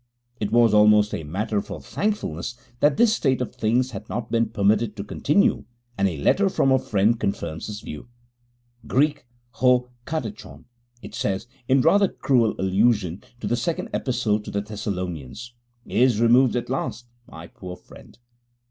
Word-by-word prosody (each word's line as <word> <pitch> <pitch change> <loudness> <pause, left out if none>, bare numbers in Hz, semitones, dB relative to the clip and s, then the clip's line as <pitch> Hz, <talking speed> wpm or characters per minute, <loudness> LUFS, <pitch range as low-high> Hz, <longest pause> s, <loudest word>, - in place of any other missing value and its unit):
It 105 -1 -2
was 115 -2 +4
almost 105 0 +5
a 80 - -3
matter 100 +7 -2
for - - -8
thankfulness 125 - -3 0.2
that 145 +1 +3
this 230 -1 +4
state 135 - +1
of 125 - -4
things 125 +4 0
had 100 - -8
not 115 0 -4
been 115 -1 +1
permitted 105 +1 +1
to 100 - -5
continue, 150 - +1 0.3
and 100 -2 +2
a 85 -5 -3
letter 195 - +2
from 135 -7 +2
a 130 - +4
friend 110 +2 +1
confirms 80 -5 -3
this 105 0 -6
view. 75 +10 -8 0.8
'[Greek: 145 -1 +1 0.2
ho 125 +1 +2 0.2
katechôn],' 110 - -6 0.4
it - - -9
says 95 0 -2 0.2
(in 135 0 +4
rather 200 +8 +4
cruel 120 -10 +1
allusion 95 -1 +1 0.2
to - - -4
the 120 - +1
Second 160 +8 -2
Epistle 110 -5 0
to 105 - -9
the 100 - -2
Thessalonians), 100 - -5 0.3
'is 125 -3 +2
removed 120 +2 +4
at 120 +1 -3
last. 125 -2 -3 0.2
My 80 +1 -10
poor 90 +1 -9
friend! - - -16
110 Hz, 160 wpm, -24 LUFS, 100-125 Hz, 0.8 s, almost